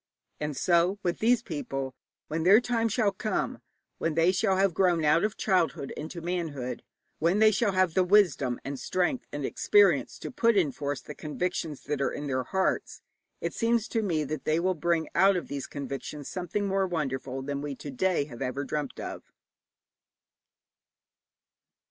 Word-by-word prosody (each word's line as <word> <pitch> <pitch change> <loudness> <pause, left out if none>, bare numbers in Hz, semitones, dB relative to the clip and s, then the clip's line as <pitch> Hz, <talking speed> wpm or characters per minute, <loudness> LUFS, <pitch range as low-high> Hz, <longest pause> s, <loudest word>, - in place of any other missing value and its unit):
And 150 -2 -3
so 175 +2 +3
with 175 -1 -1
these 235 +1 +3
people, 135 - -4 0.3
when 160 +2 -2
their 195 +6 +7
time 235 -2 0
shall 215 -1 +2
come, 210 +2 -2 0.4
when 165 -2 -1
they 165 +2 +4
shall 190 0 +1
have 195 -2 +3
grown 175 -3 +2
out 150 +3 +4
of 215 -1 -1
childhood 180 -8 0
into 165 +3 -6
manhood, 160 -8 -3 0.4
when 170 +5 +2
they 215 0 +6
shall 205 0 +1
have 185 -3 +2
the 185 - +4
wisdom 175 -10 +3
and 140 -1 -4
strength 185 +8 -1
and - - -3
experience 415 0 +3
to - - -7
put 230 -2 +3
in 165 -7 +3
force 140 -1 -4
the 150 - -9
convictions 155 -1 -3
that 145 -1 -2
are - - +2
in 145 - -5
their 130 -2 -1
hearts, 190 +6 -1 0.4
it - - -2
seems 230 -1 +1
to 225 - 0
me 170 -7 0
that 150 0 -4
they 155 +1 +1
will 185 +2 +1
bring 170 0 0
out 195 +1 +5
of 180 - -3
these 140 -1 -4
convictions 140 +1 -6
something 185 +2 -3
more 195 0 +1
wonderful 135 -5 -3
than 140 0 -3
we 145 -1 -4
to 145 - -8
day 180 +3 +1
have 120 -5 -11 0.3
dreamt 145 -1 -3
of. - - -7
170 Hz, 175 wpm, -28 LUFS, 145-195 Hz, 0.4 s, their